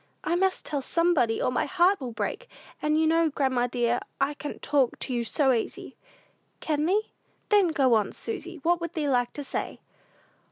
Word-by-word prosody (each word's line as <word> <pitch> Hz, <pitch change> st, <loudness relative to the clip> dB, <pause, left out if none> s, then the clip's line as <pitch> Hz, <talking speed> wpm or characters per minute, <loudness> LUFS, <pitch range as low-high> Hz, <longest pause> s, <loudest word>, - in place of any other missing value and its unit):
I 330 Hz, +3 st, 0 dB
must 380 Hz, +1 st, 0 dB
tell 285 Hz, -2 st, -1 dB
somebody, 300 Hz, -7 st, +2 dB
or -, -, +1 dB
my -, -, 0 dB
heart 370 Hz, 0 st, +3 dB
will 250 Hz, -2 st, -4 dB
break; -, -, -4 dB, 0.3 s
and 305 Hz, +1 st, +2 dB
you 320 Hz, -, +3 dB
know, 325 Hz, 0 st, +3 dB
grandma 260 Hz, -4 st, 0 dB
dear, 240 Hz, 0 st, 0 dB, 0.2 s
I 275 Hz, +2 st, +1 dB
can 295 Hz, 0 st, -7 dB
talk 275 Hz, -4 st, +1 dB
to 255 Hz, -, -4 dB
you 240 Hz, -1 st, 0 dB
so 265 Hz, +3 st, +2 dB
easy." 230 Hz, -, -4 dB, 0.6 s
"Can 305 Hz, 0 st, 0 dB
thee? 415 Hz, +4 st, 0 dB, 0.4 s
Then 410 Hz, -3 st, +5 dB
go 275 Hz, -6 st, +2 dB
on, 215 Hz, -2 st, +2 dB
Susy; 370 Hz, -5 st, -5 dB
what 345 Hz, +1 st, +2 dB
would 335 Hz, 0 st, -4 dB
thee 310 Hz, -4 st, -1 dB
like 245 Hz, -3 st, +1 dB
to 290 Hz, -, -6 dB
say?" -, -, -4 dB
295 Hz, 190 wpm, -27 LUFS, 250-345 Hz, 0.6 s, Then